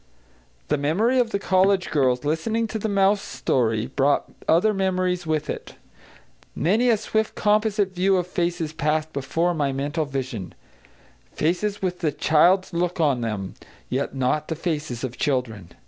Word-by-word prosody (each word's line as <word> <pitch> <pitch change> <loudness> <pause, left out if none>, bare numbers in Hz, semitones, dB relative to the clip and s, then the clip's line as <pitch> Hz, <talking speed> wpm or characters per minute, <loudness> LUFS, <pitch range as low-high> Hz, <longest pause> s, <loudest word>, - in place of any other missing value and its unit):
The - - +1
memory 210 - +2
of 240 -2 +2
the 200 - -1
college 190 -1 +2
girls 130 -3 +1
listening 220 +10 0
to 220 - -3
the 220 - -2
mouse 200 0 +3
story 115 - 0
brought 140 +2 +1 0.2
other 180 +7 +4
memories 185 -3 0
with 155 -1 -1
it. - - -6 0.8
Many 210 - +2
a 225 - +4
swift 220 +1 -1
composite 210 -2 +1
view 190 +1 +2
of 180 - 0
faces 175 -3 -2
passed 155 0 -1
before 165 +6 0
my 145 -4 0
mental 145 +4 -2
vision, 130 -8 -5 0.8
faces 195 +6 -1
with 180 -1 -1
the 160 -4 0
child's 170 +6 +3
look 175 +1 -1
on 140 -6 +2
them, 105 -5 -3 0.4
yet 135 +2 -2
not 135 +3 0
the 160 - -3
faces 150 -7 -3
of 125 -1 -5
children. 120 - -1
165 Hz, 155 wpm, -24 LUFS, 140-195 Hz, 0.8 s, other